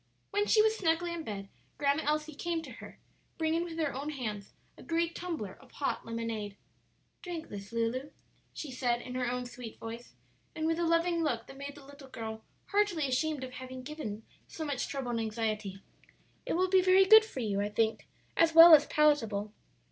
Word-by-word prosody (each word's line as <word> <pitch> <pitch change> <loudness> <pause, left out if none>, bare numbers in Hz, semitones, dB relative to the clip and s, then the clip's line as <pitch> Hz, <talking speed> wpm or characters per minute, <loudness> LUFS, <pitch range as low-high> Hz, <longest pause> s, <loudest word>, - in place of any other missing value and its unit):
When 410 +1 +1
she 430 - +5
was 440 0 +3
snugly 340 -2 0
in 340 - -4
bed, 200 -6 -6 0.3
Grandma 285 +1 +2
Elsie 305 +1 0
came 335 +2 -3
to - - -9
her, - - -11 0.4
bringing 325 +1 +1
with 335 -2 -7
her 310 -4 0
own 280 +3 -4
hands 215 -9 -5 0.2
a - - -14
great 335 0 -1
tumbler 315 - -5
of - - -19
hot 280 - -2
lemonade. 225 -3 -4 0.6
"Drink 340 -3 -6
this, 200 0 -8
Lulu," 230 +4 -1 0.4
she 295 - -7
said, 240 -2 0
in 250 - -7
her 250 -1 -1
own 250 0 -2
sweet 245 -2 -9
voice 230 +1 -8 0.4
and 315 -1 -2
with 325 +1 +1
a 340 - +1
loving 335 +1 +2
look 240 -8 -1
that 270 - -12
made 280 +1 -7
the 285 -2 -13
little 280 0 -13
girl 220 -2 -6 0.3
heartily 400 -8 +2
ashamed 280 +2 0
of 255 - -6
having 255 0 -8
given 250 -7 -6 0.2
so 320 - -6
much 285 -4 -2
trouble 265 -3 -3
and 230 - -1
anxiety; 215 -3 -2 0.7
"it - - 0
will 370 +2 +2
be 375 0 +5
very 375 +1 +6
good 440 +3 +9
for 435 -12 -6
you, 200 -3 0
I 205 - -1
think, 220 +1 0 0.3
as 325 -1 +3
well 330 0 +11
as 295 -1 +8
palatable." 225 -9 +2
280 Hz, 195 wpm, -31 LUFS, 230-330 Hz, 0.7 s, well